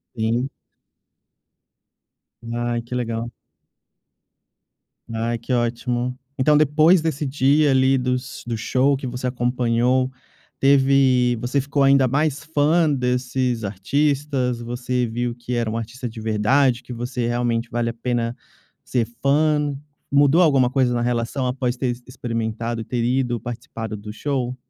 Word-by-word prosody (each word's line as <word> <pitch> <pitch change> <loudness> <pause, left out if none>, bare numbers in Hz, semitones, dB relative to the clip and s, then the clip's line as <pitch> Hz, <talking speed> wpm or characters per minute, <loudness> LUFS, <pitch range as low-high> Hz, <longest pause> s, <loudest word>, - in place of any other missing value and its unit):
Sim. 115 +4 0 2.0
Ai, 120 0 -1
que 125 +1 -6
legal. 115 -1 -2 1.8
Ai, 115 +1 -1
que 115 +3 -7
ótimo. 120 +1 -1 0.2
Então 150 +3 +4
depois 155 +4 +4
desse 155 -2 -2
dia 140 +2 +3
ali, 130 0 +4
dos 125 0 -3
do 115 -2 -2
show 130 +4 +2
que 135 - -6
você 125 +1 -3
acompanhou, 125 +1 +1 0.5
teve 135 -3 +4
você 130 +3 0
ficou 140 +1 0
ainda 135 -1 +5
mais 145 +2 0
fã 155 +1 +2
desses 125 -2 -1
artistas? 135 +3 0
Você 125 +1 -2
viu 120 +1 -3
que 120 0 -5
era 115 -2 0
um 115 - -2
artista 120 +2 -5
de 110 0 -8
verdade 120 +4 +2
que 125 - -9
você, 120 0 -3
realmente, 120 -1 -1
vale 120 0 -1
a - - -4
pena 120 0 -2 0.5
ser 120 -3 0 0.2
fã? 150 0 +2 0.4
Mudou 145 +4 +5
alguma 135 -7 +4
coisa 130 -2 +1
na 120 - 0
relação 120 +2 -1
após 125 -1 -1
ter 130 0 -2
ex 120 0 -3
experimentado 115 -1 -3
e - - -4
ter 120 -2 -2
ido, 120 -1 0
participado 115 -1 -6
do 105 +1 -8
show? 130 -2 -2
125 Hz, 140 wpm, -22 LUFS, 120-135 Hz, 2.0 s, ainda